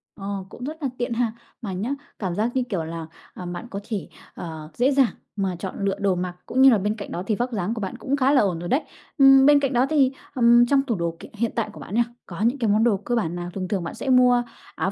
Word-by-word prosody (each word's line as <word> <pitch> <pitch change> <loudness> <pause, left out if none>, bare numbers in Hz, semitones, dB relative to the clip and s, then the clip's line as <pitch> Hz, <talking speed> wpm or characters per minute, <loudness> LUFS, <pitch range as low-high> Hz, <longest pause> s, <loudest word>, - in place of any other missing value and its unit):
Ờ, 195 -1 -5
cũng 245 - -10
rất 305 +4 -5
là 270 - +1
tiện 240 0 -2
ha. 230 -1 0 0.3
Mà 200 -4 -4
nhá, 205 +7 -3 0.3
cảm 185 -4 -2
giác 225 +3 0
như 255 - +2
kiểu 180 -6 -1
là, 165 0 -6 0.3
ờ, 180 - -8
bạn 175 +7 -6
có 200 - -5
thể, 210 -4 -3 0.3
ờ, 160 -2 -7
dễ 255 +3 +2
dàng 270 -4 +3 0.2
mà 190 -3 -1
chọn 190 - -5
lựa 195 0 +1
đồ 195 -2 +2
mặc 180 0 -3
cũng 260 - 0
như 270 - +9
là 230 - +5
bên 210 +2 -1
cạnh 200 - -8
đó 175 - -3
thì 215 - +1
vóc 245 +3 -2
dáng 205 0 -1
của 220 - -5
bạn 195 +5 -4
cũng 275 +2 -1
khá 270 +1 +3
là 270 - +5
ổn 180 -5 0
rồi 175 - -5
đấy. 280 +5 +2 0.4
Ừm, 270 -1 +7
bên 290 0 +7
cạnh 275 -2 -1
đó 245 +2 +3
thì, 275 -4 +4 0.2
ừm, 240 0 +6
trong 275 +2 +3
tủ 245 -5 -2
đồ 170 -1 -2
kiện - - -11
hiện 225 +1 -1
tại 225 -2 -1
của - - -11
bạn 205 - -7
nha, 240 - +4 0.2
có 175 +1 -8
những 240 +5 +2
cái 225 - +1
món 215 +2 +3
đồ 225 -4 +3
cơ 240 +5 -2
bản 175 -6 -1
nào? 175 0 -5
Thường 185 -2 -3
thường 190 -3 -1
bạn 170 - -6
sẽ 270 - -4
mua 250 -1 +5 0.3
áo 190 - -1
220 Hz, 285 wpm, -24 LUFS, 185-250 Hz, 0.4 s, như